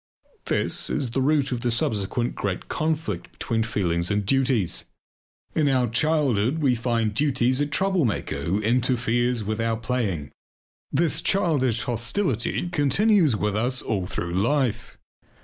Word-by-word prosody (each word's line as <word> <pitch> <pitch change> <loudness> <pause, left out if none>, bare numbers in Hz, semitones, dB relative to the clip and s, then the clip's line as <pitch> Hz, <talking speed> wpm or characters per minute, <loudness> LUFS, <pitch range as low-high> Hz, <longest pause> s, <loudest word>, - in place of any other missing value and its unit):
This - - -1
is 125 -4 -1
the 135 - 0
root 140 0 +2
of 125 - -1
the 120 - 0
subsequent 115 0 0
great 95 -3 -3
conflict 155 - -2
between 115 -1 -2
feelings 90 -6 0
and 105 -1 0
duties. 125 -6 +1 0.7
In 150 -3 +2
our 130 -2 +2
childhood 135 -1 +1
we 140 -5 +2
find 115 -2 0
duties 130 0 +1
a 145 - +1
troublemaker 150 - 0
who 85 +8 0
interferes 120 0 +1
with 110 +2 -2
our 115 0 0
playing; 110 - -2 0.6
this 160 +3 +1
childish 135 - +2
hostility 120 - -1
continues 175 - +3
with 105 0 -1
us 125 +4 0
all 95 -5 -2
through 85 -1 -4
life. 120 +5 0
120 Hz, 135 wpm, -24 LUFS, 110-140 Hz, 0.7 s, continues